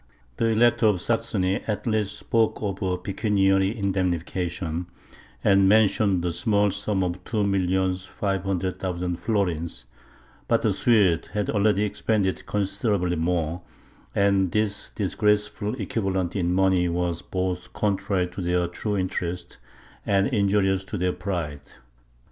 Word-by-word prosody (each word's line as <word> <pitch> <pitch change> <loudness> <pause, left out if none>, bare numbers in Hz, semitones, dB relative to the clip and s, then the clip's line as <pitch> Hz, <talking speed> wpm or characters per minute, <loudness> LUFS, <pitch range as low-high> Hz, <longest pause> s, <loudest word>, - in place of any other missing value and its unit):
The - - +1
Elector 115 0 +4
of 100 -4 +2
Saxony 100 -2 0
at 105 -2 -2
last 105 -3 0
spoke 115 0 +1
of 100 -2 -3
a 90 -2 0
pecuniary 95 +1 +1
indemnification, 90 -3 -2 0.6
and 95 -1 +5
mentioned 100 -3 +3
the 90 - 0
small 105 +2 +2
sum 100 -1 -1
of 90 0 -3
two 110 0 -1
millions 95 -1 0
five 95 0 -2
hundred 95 -1 -2
thousand 90 -1 -3
florins; 85 - -2 0.6
but - - +2
the - - +2
Swedes 100 -9 +3
had 105 -1 -1
already 105 -1 +2
expended 105 -2 -1
considerably 100 -2 0
more, 85 0 -1 0.5
and 100 -2 +3
this 105 -1 -1
disgraceful 105 +2 0
equivalent 95 -3 -1
in 90 -3 0
money 95 -1 +3
was 85 -1 -1
both 90 -1 -3
contrary 100 -2 0
to 90 - -6
their 90 0 +1
true 105 +4 -3
interests, 90 -1 -3 0.5
and 100 -1 +2
injurious 100 -4 +2
to 105 - -4
their 90 0 0
pride. 85 -6 -4
95 Hz, 130 wpm, -25 LUFS, 90-105 Hz, 0.6 s, and